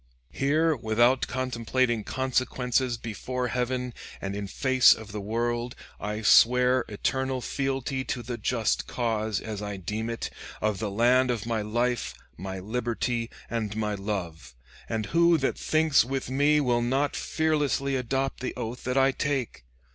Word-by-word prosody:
Here, 155 Hz, +3 st, +2 dB
without 120 Hz, +2 st, +2 dB
contemplating 125 Hz, -2 st, 0 dB
consequences, 130 Hz, -1 st, 0 dB
before 125 Hz, +3 st, -3 dB
Heaven, 125 Hz, 0 st, -2 dB, 0.3 s
and 100 Hz, 0 st, -4 dB
in 100 Hz, 0 st, -4 dB
face 130 Hz, +4 st, +5 dB
of 110 Hz, -2 st, -10 dB
the 105 Hz, 0 st, -4 dB
world, 120 Hz, +3 st, -2 dB, 0.2 s
I 105 Hz, +2 st, -4 dB
swear 125 Hz, +3 st, +5 dB
eternal 130 Hz, +5 st, -1 dB
fealty 135 Hz, 0 st, -2 dB
to 120 Hz, -, -3 dB
the 120 Hz, 0 st, -5 dB
just -, -, 0 dB
cause, 110 Hz, -3 st, -1 dB
as 105 Hz, -2 st, -6 dB
I 105 Hz, -1 st, -4 dB
deem 105 Hz, +5 st, -3 dB
it, 115 Hz, -, -4 dB, 0.3 s
of 105 Hz, -2 st, 0 dB
the 110 Hz, -, -2 dB
land 125 Hz, +5 st, +3 dB
of 115 Hz, -4 st, -1 dB
my 115 Hz, -2 st, -1 dB
life, 120 Hz, +3 st, -1 dB, 0.2 s
my 95 Hz, +1 st, -6 dB
liberty, 115 Hz, +3 st, -2 dB, 0.2 s
and 110 Hz, -3 st, -3 dB
my 105 Hz, -1 st, -1 dB
love. 90 Hz, -, -5 dB, 0.3 s
And 110 Hz, -1 st, -1 dB
who 170 Hz, +5 st, +4 dB
that 135 Hz, -3 st, -1 dB
thinks 155 Hz, -4 st, +3 dB
with 130 Hz, +1 st, -3 dB
me 145 Hz, +3 st, +4 dB
will 120 Hz, -4 st, +2 dB
not 135 Hz, +4 st, 0 dB
fearlessly 150 Hz, -3 st, 0 dB
adopt 135 Hz, +2 st, -1 dB
that 125 Hz, -, -4 dB
oath 115 Hz, +2 st, -5 dB
that 125 Hz, +1 st, 0 dB
I 135 Hz, 0 st, +5 dB
take? 135 Hz, -, -2 dB
120 Hz, 150 wpm, -27 LUFS, 110-130 Hz, 0.3 s, face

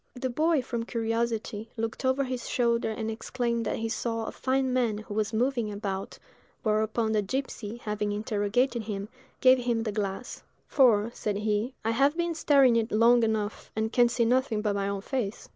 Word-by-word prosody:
The 255 Hz, 0 st, -3 dB
boy, 310 Hz, +1 st, +2 dB
from 235 Hz, -2 st, -3 dB
curiosity, 225 Hz, -2 st, -2 dB
looked 225 Hz, +3 st, -3 dB
over 260 Hz, +1 st, +2 dB
his 255 Hz, -2 st, -4 dB
shoulder 235 Hz, -2 st, +1 dB
and 220 Hz, 0 st, -3 dB
exclaimed 235 Hz, 0 st, -2 dB
that -, -, 0 dB
he 225 Hz, -, -2 dB
saw 225 Hz, 0 st, -2 dB
"a -, -, -4 dB
fine 260 Hz, 0 st, 0 dB
man 235 Hz, -4 st, +1 dB
who 215 Hz, -1 st, -8 dB
was 210 Hz, 0 st, 0 dB
moving 235 Hz, -1 st, 0 dB
about;" 200 Hz, -2 st, -4 dB, 0.5 s
whereupon 220 Hz, 0 st, +1 dB
the 215 Hz, -1 st, +2 dB
gipsy, 235 Hz, -1 st, -4 dB
having 210 Hz, -2 st, -2 dB
interrogated 215 Hz, +4 st, 0 dB
him, 205 Hz, -1 st, -4 dB, 0.3 s
gave 255 Hz, 0 st, +6 dB
him 240 Hz, -2 st, 0 dB
the 215 Hz, -, -2 dB
glass; 205 Hz, +2 st, -4 dB, 0.2 s
"for," 235 Hz, -5 st, +4 dB
said 210 Hz, -4 st, -2 dB
he, 215 Hz, +4 st, -1 dB
"I 225 Hz, -, +2 dB
have 275 Hz, +7 st, +2 dB
been 345 Hz, -1 st, 0 dB
staring 275 Hz, -6 st, +4 dB
in 225 Hz, -, +2 dB
it -, -, -26 dB
long 235 Hz, +3 st, +5 dB
enough, 220 Hz, -2 st, -1 dB
and 220 Hz, +1 st, -1 dB
can 240 Hz, -1 st, +5 dB
see 235 Hz, 0 st, +1 dB
nothing 240 Hz, -3 st, +1 dB
but 210 Hz, -2 st, +1 dB
my 200 Hz, 0 st, -1 dB
own 200 Hz, -1 st, -2 dB
face." 225 Hz, -2 st, -3 dB
230 Hz, 190 wpm, -28 LUFS, 215-250 Hz, 0.5 s, gave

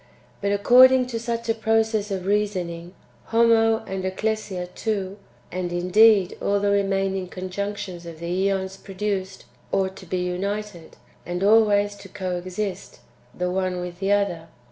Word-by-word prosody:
But, 200 Hz, 0 st, 0 dB
according 255 Hz, +5 st, +6 dB
to 230 Hz, -, -1 dB
such 235 Hz, 0 st, -3 dB
a 225 Hz, -, +3 dB
process 220 Hz, -1 st, +1 dB
of 190 Hz, -2 st, -3 dB
reasoning, 185 Hz, -4 st, -2 dB, 0.3 s
Homo 225 Hz, -1 st, +3 dB
and 190 Hz, 0 st, -4 dB
Ecclesia 190 Hz, -1 st, -2 dB
too, 200 Hz, -3 st, -3 dB, 0.3 s
and 180 Hz, -1 st, -3 dB
indeed 190 Hz, +2 st, +4 dB
all 200 Hz, 0 st, +1 dB
the 200 Hz, 0 st, +1 dB
remaining 195 Hz, -1 st, 0 dB
conjunctions 185 Hz, -1 st, -5 dB
of 165 Hz, -1 st, -8 dB
the 180 Hz, +3 st, 0 dB
^ons 190 Hz, 0 st, -3 dB
produced, 195 Hz, -1 st, -4 dB, 0.3 s
ought 190 Hz, -1 st, 0 dB
to 185 Hz, -, -12 dB
be 185 Hz, -, -2 dB
united, 195 Hz, 0 st, -4 dB, 0.3 s
and 175 Hz, +2 st, -3 dB
always 205 Hz, -1 st, +4 dB
to 200 Hz, -1 st, -12 dB
co 185 Hz, -2 st, -3 dB
exist, 185 Hz, +2 st, -5 dB, 0.4 s
the 180 Hz, 0 st, -1 dB
one 185 Hz, -1 st, -1 dB
with 180 Hz, 0 st, -6 dB
the 195 Hz, +1 st, 0 dB
other. 200 Hz, -5 st, 0 dB
195 Hz, 145 wpm, -24 LUFS, 185-210 Hz, 0.4 s, according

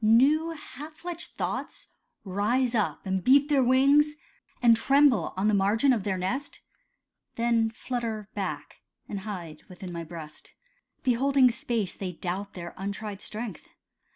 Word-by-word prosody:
New 275 Hz, +9 st, +5 dB
half 300 Hz, -1 st, -9 dB
fledged 345 Hz, +1 st, -7 dB
thoughts -, -, -3 dB, 0.4 s
rise 225 Hz, +6 st, +1 dB
up 215 Hz, -4 st, -1 dB
and 190 Hz, -1 st, -1 dB
beat 280 Hz, +3 st, +5 dB
their 285 Hz, -2 st, +4 dB
wings, 280 Hz, +4 st, +4 dB, 0.4 s
And 235 Hz, -2 st, +6 dB
tremble 270 Hz, -, +4 dB
on 195 Hz, +3 st, +1 dB
the 215 Hz, -, +3 dB
margin 210 Hz, +7 st, +3 dB
of 215 Hz, -5 st, -2 dB
their 190 Hz, -2 st, 0 dB
nest, 265 Hz, +11 st, -3 dB, 0.8 s
Then 230 Hz, -1 st, +2 dB
flutter 225 Hz, -2 st, -4 dB
back, 195 Hz, -3 st, -5 dB, 0.3 s
and 200 Hz, -, -4 dB
hide 180 Hz, -7 st, -7 dB
within 180 Hz, -1 st, -8 dB
my 170 Hz, 0 st, -4 dB
breast. 160 Hz, -2 st, -9 dB, 0.5 s
Beholding 260 Hz, +1 st, +4 dB
space, 230 Hz, -5 st, -2 dB
they 185 Hz, -2 st, -5 dB
doubt 190 Hz, +4 st, -4 dB
their 170 Hz, -2 st, -7 dB
untried 200 Hz, +1 st, -5 dB
strength. 215 Hz, -4 st, -6 dB
225 Hz, 140 wpm, -27 LUFS, 195-265 Hz, 0.8 s, And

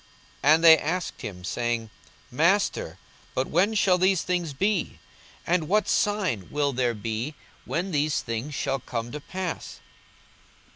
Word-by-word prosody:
42:021:007 145 Hz, +3 st, +7 dB
And 165 Hz, -, -2 dB
they 160 Hz, -1 st, +10 dB
asked 170 Hz, +3 st, -3 dB
him, 90 Hz, -3 st, -7 dB
saying, 115 Hz, +4 st, -2 dB, 0.4 s
Master, -, -, +1 dB, 0.4 s
but 130 Hz, -, +1 dB
when 195 Hz, +6 st, +2 dB
shall 185 Hz, -3 st, +3 dB
these 185 Hz, -1 st, +3 dB
things 175 Hz, -3 st, -1 dB
be? 195 Hz, +6 st, -1 dB, 0.5 s
and 170 Hz, -2 st, +1 dB
what 210 Hz, +4 st, +2 dB
sign 190 Hz, -, 0 dB
will 145 Hz, -1 st, 0 dB
there 120 Hz, -2 st, 0 dB
be 115 Hz, +7 st, -4 dB, 0.3 s
when 185 Hz, +3 st, -2 dB
these 150 Hz, -1 st, +1 dB
things 115 Hz, +6 st, -4 dB
shall 135 Hz, 0 st, -1 dB
come 120 Hz, -1 st, -5 dB
to 150 Hz, -, -5 dB
pass? 185 Hz, +2 st, -5 dB
150 Hz, 145 wpm, -26 LUFS, 120-180 Hz, 0.5 s, they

